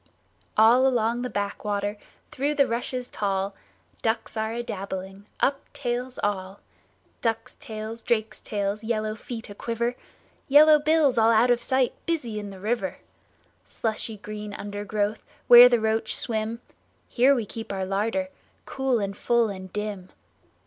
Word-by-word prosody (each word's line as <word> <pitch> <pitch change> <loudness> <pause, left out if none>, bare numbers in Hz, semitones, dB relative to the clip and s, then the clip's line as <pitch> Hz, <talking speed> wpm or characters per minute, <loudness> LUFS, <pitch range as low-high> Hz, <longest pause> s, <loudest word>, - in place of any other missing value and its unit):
All 235 +5 +6
along 240 -1 +1
the 250 - -3
backwater, 205 0 -2 0.4
Through 285 +3 -1
the 280 -1 +4
rushes 245 +1 -3
tall, 195 -2 -2 0.5
Ducks 225 +1 -1
are 220 0 -1
a 240 +1 -3
dabbling, 195 -1 -6
Up 275 0 0
tails 250 0 -3
all! 195 -1 -2 0.6
Ducks' 225 -2 -2
tails, 220 +1 -7
drakes' 220 -2 -1
tails, 205 0 -2
Yellow 215 -1 -1
feet 225 +1 -7
a - - -6
quiver, 235 +3 -2 0.5
Yellow 300 +2 +7
bills 300 -4 +3
all 225 0 +5
out 230 +2 +5
of 240 0 +2
sight 260 0 +1
Busy 245 -11 -2
in 205 -1 -6
the 195 -1 -10
river! 240 +7 -2 0.7
Slushy 220 -1 -3
green 210 0 -7
undergrowth 205 +1 -3 0.2
Where 245 +1 +10
the 240 -1 +3
roach 220 0 0
swim— 225 0 -1 0.5
Here 260 +3 +4
we 235 -4 -1
keep 225 +1 -7
our 190 -1 -2
larder, 225 +9 -1 0.4
Cool 265 -2 0
and 200 -2 -3
full 235 +1 +2
and 185 -2 -8
dim. 210 -3 -5
225 Hz, 145 wpm, -25 LUFS, 205-245 Hz, 0.7 s, Where